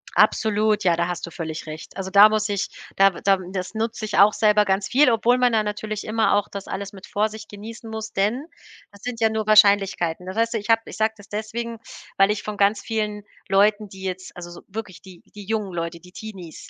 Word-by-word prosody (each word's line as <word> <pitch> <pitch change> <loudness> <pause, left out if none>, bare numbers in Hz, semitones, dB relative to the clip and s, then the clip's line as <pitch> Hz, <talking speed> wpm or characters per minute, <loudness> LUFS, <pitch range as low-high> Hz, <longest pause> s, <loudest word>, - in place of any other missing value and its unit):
Absolut, 215 -1 +3
ja, 175 -2 +3
da 170 +1 0
hast 175 - -4
du 170 - -10
völlig 160 -1 -6
recht. 155 +4 -9
Also, 190 0 -4
da 205 +2 +8
muss 215 0 0
ich 200 -1 -1 0.3
da 195 0 +7
da 195 +2 +1
das 185 +2 -4
nutze 225 0 -3
ich 210 - -3
auch 205 +1 +7
selber 210 -1 +4
ganz 190 -1 0
viel, 275 +1 +4
obwohl 240 +2 +3
man 250 -1 +3
da 220 -1 +3
natürlich 210 0 -4
immer 215 -2 +1
auch 205 0 +1
das 200 -1 -7
alles 195 +1 -5
mit 190 -2 -12
Vorsicht 215 +1 -2
genießen 220 +2 -9
muss, 220 0 -6
denn 215 +9 0 0.5
das 200 0 -17
sind 245 -2 -5
ja 220 - +4
nur 220 -1 -2
Wahrscheinlichkeiten. 200 -5 +4
Das 185 - -5
heißt 230 +1 +1
ja, 225 - 0
ich 210 - -10
habe 225 0 +5
ich - - -9
sage 220 0 +1
das 205 - -16
deswegen, 225 +2 -4 0.4
weil 195 +1 +5
ich 210 0 -1
von 210 -1 -5
ganz 200 +1 +3
vielen 210 -2 -3 0.3
Leuten, 205 +2 +3
die 190 0 -11
jetzt 185 0 -5
also, 175 -1 -8
so 175 - -11
wirklich 205 -3 -7
die 185 -3 -15
die 205 -2 -9
jungen 210 -3 -2
Leute, 170 0 -4
die 180 +2 -17
Teenies, 190 -6 -10
205 Hz, 230 wpm, -23 LUFS, 190-220 Hz, 0.5 s, da